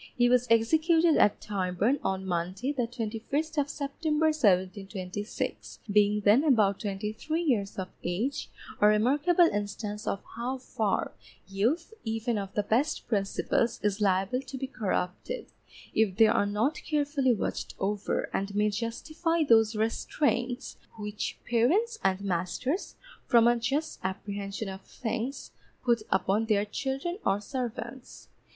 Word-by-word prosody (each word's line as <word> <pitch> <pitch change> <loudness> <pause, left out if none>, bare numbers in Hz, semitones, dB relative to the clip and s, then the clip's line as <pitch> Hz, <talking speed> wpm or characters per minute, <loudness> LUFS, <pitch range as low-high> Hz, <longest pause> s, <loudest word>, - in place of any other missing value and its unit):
He 245 0 +4
was 250 0 +3
executed 315 +8 +4
at 205 - +4
Tyburn, 200 +6 0
on 190 0 -1
Monday, 185 +8 -1
the 245 -4 -1
21st 245 +7 -2
of 285 - -4
September, 300 +2 -1
1726, 195 -4 -1
being 210 0 +4
then 210 +7 +5
about 215 -10 +3
twenty 210 0 -3
three 315 +9 -2
years 215 -10 0
of 190 -1 -3 0.2
age, 210 +11 -2 0.3
a 210 - +6
remarkable 285 +12 +4
instance 205 -3 -3
of 200 - -2
how 245 +3 -2
far 220 -5 -1 0.4
youth, 240 - 0
even 225 0 -1
of 195 -1 -5
the 210 - +1
best 260 +10 0
principles, 215 +2 0
is 210 0 0
liable 195 +5 +2
to 270 0 -8
be 265 - -3
corrupted, 225 - -3 0.4
if 215 -4 +2
they 225 - +8
are 205 -1 +3
not 220 +9 0
carefully 285 -4 +1
watched - - -3
over 200 +1 -1
and 200 +1 -2
may 210 0 +2
justify 310 - -1
those 225 -5 +4
restraints 245 +3 -1 0.2
which 210 -1 -4
parents 370 - +2
and 190 0 +1
masters, 195 - -2 0.3
from 235 -2 +6
a 240 - +5
just 275 +7 -2
apprehension 200 +2 -4
of 190 0 -6
things, 245 +6 -4 0.3
put 235 -2 +3
upon 195 +4 +1
their 210 -2 +2
children 275 - -3
or 195 - +2
servants. 245 +1 -6
225 Hz, 135 wpm, -29 LUFS, 200-275 Hz, 0.4 s, they